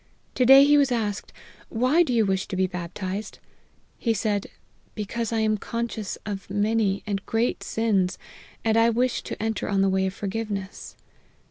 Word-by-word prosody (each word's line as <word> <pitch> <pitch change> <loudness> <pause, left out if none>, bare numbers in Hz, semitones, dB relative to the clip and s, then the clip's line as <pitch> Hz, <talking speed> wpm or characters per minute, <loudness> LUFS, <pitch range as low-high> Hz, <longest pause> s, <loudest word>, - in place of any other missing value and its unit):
To 250 - +2
day 270 +1 +10
he 290 0 +5
was 275 -2 +2
asked, 210 -4 -2 0.4
Why 255 +8 +3
do 320 - +1
you 230 -3 +3
wish 190 -1 -1
to - - -4
be 190 0 +2
baptized 185 +3 -5 0.3
?' - - -38
He 230 -2 +1
said, 205 -3 -1 0.2
* - - -37
Because 225 +2 -3
1 225 -1 +1
am 215 -1 +2
conscious 230 -3 -4
of 200 -3 -5
many 205 -1 +1
and 200 -1 -3
great 225 +2 0
sins, 195 -5 0 0.5
and 220 0 +3
I 230 +1 +5
wish 245 +2 0
to - - -7
enter 220 0 -2
on 195 -1 +2
the 195 - +3
way 190 0 +1
of 190 - -5
forgiveness.' 200 -2 -5
215 Hz, 185 wpm, -25 LUFS, 195-230 Hz, 0.5 s, day